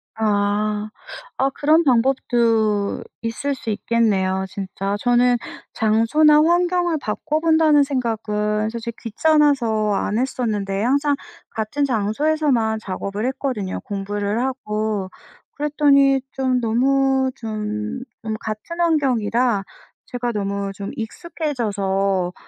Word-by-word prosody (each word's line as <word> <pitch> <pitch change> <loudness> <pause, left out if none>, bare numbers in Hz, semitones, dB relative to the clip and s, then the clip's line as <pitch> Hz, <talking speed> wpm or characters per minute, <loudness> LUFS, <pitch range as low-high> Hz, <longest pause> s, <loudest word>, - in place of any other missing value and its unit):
아. 210 0 0 0.5
아 270 - +2
그런 310 +3 +4
방법도 230 -5 +2 0.2
있을 230 +5 -2
수 235 - -7
있겠네요 200 -4 +1
진짜. 195 +1 -4
저는 245 +1 +3 0.4
장소나 230 +8 +4
환경을 350 0 +2
바꿔 300 +8 -2
본다는 315 -2 +4
생각은 215 -5 -1
솔직히 235 0 -6
귀찮아서 235 -5 +2
안 210 +2 -1
했었는데 210 -6 -1
항상 285 +4 +2 0.4
같은 225 +7 -1
장소에서만 235 0 +1
작업을 200 +2 -4
했거든요 260 -8 -3
공부를 205 +2 -2
하고. 215 -6 -2 0.5
그랬더니 280 -2 +3
좀 260 -1 0
너무 265 +3 +2
좀, 215 +2 -4 0.2
좀 220 -1 -3
같은 220 +12 -6
환경이라 250 -9 +1 0.4
제가 245 -1 -3
'너무 200 -1 -2
좀 200 0 -6
익숙해져서 200 - -2
230 Hz, 240 characters per minute, -21 LUFS, 210-275 Hz, 0.5 s, 그런